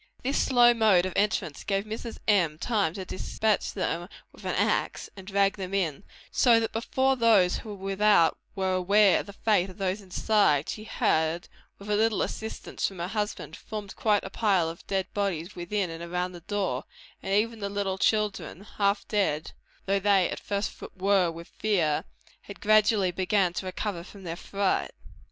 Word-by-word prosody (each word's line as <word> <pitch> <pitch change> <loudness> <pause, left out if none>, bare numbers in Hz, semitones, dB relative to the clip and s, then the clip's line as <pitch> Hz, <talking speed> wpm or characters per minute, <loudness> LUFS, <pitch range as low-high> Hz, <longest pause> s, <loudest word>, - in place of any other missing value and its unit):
This 270 +3 0
slow 240 -2 +5
mode 215 -6 +4
of 185 - -3
entrance 200 -7 0
gave 195 -1 0
time 215 - -13
to - - 0
Mrs. - - -10
M. 175 -8 +3
to 195 -3 -1
despatch 215 +3 -1
them 175 -2 -3 0.2
with - - -16
an - - -1
axe, - - 0
and 190 -1 -11
drag 200 0 +2
them 190 0 -4
in; 175 -4 -1 0.3
so 235 -3 +5
that 225 - -2
before 260 +4 +1
those 220 -7 +3
without 200 -3 +2 0.2
were 190 -1 0
aware 195 +2 +4
of - - -6
the 200 - -9
fate 200 -3 +1
of 185 - -12
those 195 +1 -1
inside, 185 -6 +2
she 215 - -5
had, 160 -5 0 0.3
with 200 - -12
a - - +3
little 220 0 +2
assistance 220 0 -4
from 195 - -9
her 175 +1 -3
husband, 210 0 -3
formed 210 -3 -7
quite 210 -2 +2
a 190 - -7
pile 195 -7 +2
of 165 - -10
dead 190 -1 0
bodies 195 -3 -2
within 180 +1 -2
and 165 0 -7
around 180 +1 -2
the 175 -1 -11
door; 190 -9 -2 0.4
and 195 - -1
even 225 +2 +1
the 200 -1 -3
little 200 -1 -2
children, 210 -3 0 0.2
half 200 0 +1
dead 165 -7 0 0.3
though 195 0 +1
they 195 -2 +3
at - - -4
first 200 0 -2 0.3
were 190 -2 +3
with 165 +1 -8
fear, 175 -10 0 0.4
had 200 - -11
gradually 210 -3 +4
begun 185 0 +1
to 185 - -4
recover 185 -1 -4
from 195 +1 -13
their 165 -2 -4
fright. 195 +2 -1
195 Hz, 180 wpm, -27 LUFS, 180-210 Hz, 0.4 s, slow